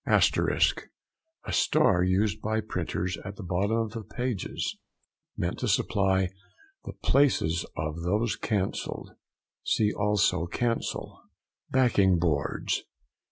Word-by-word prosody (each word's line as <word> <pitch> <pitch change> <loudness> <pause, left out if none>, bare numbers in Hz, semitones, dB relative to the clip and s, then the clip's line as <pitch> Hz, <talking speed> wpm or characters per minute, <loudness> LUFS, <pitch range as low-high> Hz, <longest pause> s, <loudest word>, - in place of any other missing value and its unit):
ASTERISK.—A 325 +1 0
star 95 - +3
used 100 +3 +1
by 110 +1 0
printers 90 -3 -3
at 95 - -7
the 105 - -8
bottom 95 +5 0
of 110 -2 -1
the 115 0 -5
pages 120 -2 -3 0.6
meant 85 0 -2
to 125 - -1
supply 95 -3 +2 0.6
the - - -6
places 90 - +2
of 80 +1 -3
those 105 +6 0
cancelled 100 -4 -2 0.5
(see 105 -1 +2
also 100 -4 +1
CANCEL). 115 +5 -2 0.5
BACKING 100 -8 +4
BOARDS. 80 -4 0
100 Hz, 110 wpm, -28 LUFS, 90-115 Hz, 0.6 s, BACKING